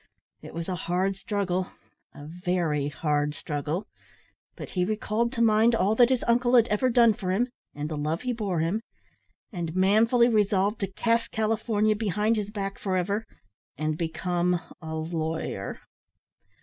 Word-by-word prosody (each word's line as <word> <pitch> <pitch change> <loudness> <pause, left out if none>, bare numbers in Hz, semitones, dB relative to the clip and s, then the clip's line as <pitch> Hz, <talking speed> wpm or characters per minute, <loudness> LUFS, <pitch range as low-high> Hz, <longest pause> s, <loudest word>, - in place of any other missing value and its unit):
It - - -10
was 170 0 -4
a 185 - -2 0.2
hard 190 +2 +1
struggle, 190 -3 -2 0.4
a 145 - -10
very 170 -3 -1
hard 150 0 -1
struggle, 150 +6 -3 0.7
but - - -8
he 180 - 0
recalled 215 +3 0
to 235 -2 +1
mind 225 +1 +4
all 210 -1 +2
that 240 +2 +5
his 260 -2 +1
uncle 240 +1 +3
had 235 -1 +6
ever 210 +5 +2
done 235 -2 +5
for 190 -2 -5
him, 230 +7 +1 0.3
and 145 +1 -3
the 155 - -4
love 155 +3 -1
he 250 -1 -1
bore 200 -7 -1
him, 175 +7 0 0.7
and 170 -4 -4
manfully 220 +6 +4
resolved 210 -2 +2
to 195 -1 -3
cast 230 +3 +1
California 215 -1 +1
behind 210 +1 +1
his 210 -2 -2
back 195 -2 -4
for 190 -2 -1
ever, 200 +5 -1 0.5
and 155 +1 -1
become 175 +2 0 0.2
a 160 -1 -5
lawyer. 160 - -3
195 Hz, 160 wpm, -27 LUFS, 170-220 Hz, 0.7 s, had